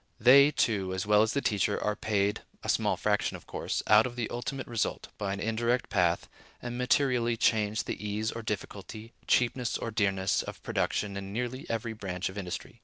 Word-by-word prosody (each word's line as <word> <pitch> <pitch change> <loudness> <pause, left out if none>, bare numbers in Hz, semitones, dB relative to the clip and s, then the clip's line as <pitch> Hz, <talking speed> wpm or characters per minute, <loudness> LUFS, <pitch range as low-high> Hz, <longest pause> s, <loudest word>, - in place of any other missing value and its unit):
They, 140 +5 +8
too, 100 -9 0
as 95 - -2
well 105 0 +5
as 110 0 +2
the 140 - -1
teacher, 105 -1 +1
are 105 - 0
paid 105 -1 0 0.2
(a - - -4
small - - +2
fraction, - - 0
of - - -18
course) - - -3
out 105 +3 +6
of 120 - -9
the 120 -2 -3
ultimate 130 +2 -4
result, 115 -2 -2
by 100 -2 -2
an 100 - -3
indirect 115 +3 0
path, 85 -1 +2 0.3
and 120 0 -5
materially 125 -2 +2
change 110 -1 +2
the - - -5
ease 105 +1 -1
or 115 - -6
difficulty, 110 +1 -6
cheapness 125 0 +2
or 115 - -4
dearness, 100 -3 +1
of - - -9
production 100 -2 -1
in 100 0 -6
nearly 125 +4 -4
every 115 0 -2
branch 95 -4 -4
of 95 - -10
industry. 90 +5 -6
110 Hz, 190 wpm, -29 LUFS, 100-120 Hz, 0.3 s, They